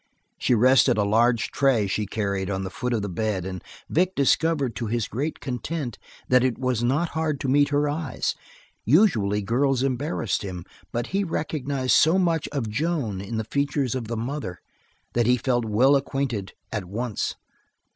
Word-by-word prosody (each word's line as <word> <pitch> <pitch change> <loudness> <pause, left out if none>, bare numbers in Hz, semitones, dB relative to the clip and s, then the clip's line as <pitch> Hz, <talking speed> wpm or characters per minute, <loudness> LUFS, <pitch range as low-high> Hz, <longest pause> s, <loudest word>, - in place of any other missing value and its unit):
She 125 - +3
rested 130 0 +5
a 105 - +3
large 115 +3 +2
tray 130 -7 +2
she 105 +2 -1
carried 100 -2 -2
on 95 -1 -2
the 95 - -5
foot 125 +3 -3
of 110 -4 0
the - - -2
bed 100 -1 -2
and 95 -2 -6 0.2
Vic 185 +3 +1
discovered, 140 -3 +2
to 115 - -3
his 115 0 -1
great 145 +7 -3
content, 130 0 -4 0.3
that 125 -1 +4
it 130 -3 +1
was 125 -2 -1
not 145 +8 +1
hard 160 -3 -1
to - - -2
meet 145 +2 +4
her 145 0 +2
eyes. 145 -2 -2 0.5
Usually 110 - +3
girls 130 +4 +1
embarrassed 135 - -1
him, 90 -3 -6 0.3
but 120 0 -2
he 200 +1 +2
recognized 140 -6 -1
so 160 +4 +5
much 170 -4 +1
of 140 -6 -3
Joan 125 - -1
in 100 +3 -4
the 110 - -1
features 140 +2 -1
of 125 -4 -3
the 115 0 -3
mother 120 -6 -4 0.5
that 120 -1 +2
he 125 0 +4
felt 120 -1 0
well 125 +6 +4
acquainted 135 -7 -2 0.2
at 105 -4 -3
once. 110 +4 -3
125 Hz, 175 wpm, -25 LUFS, 110-145 Hz, 0.5 s, rested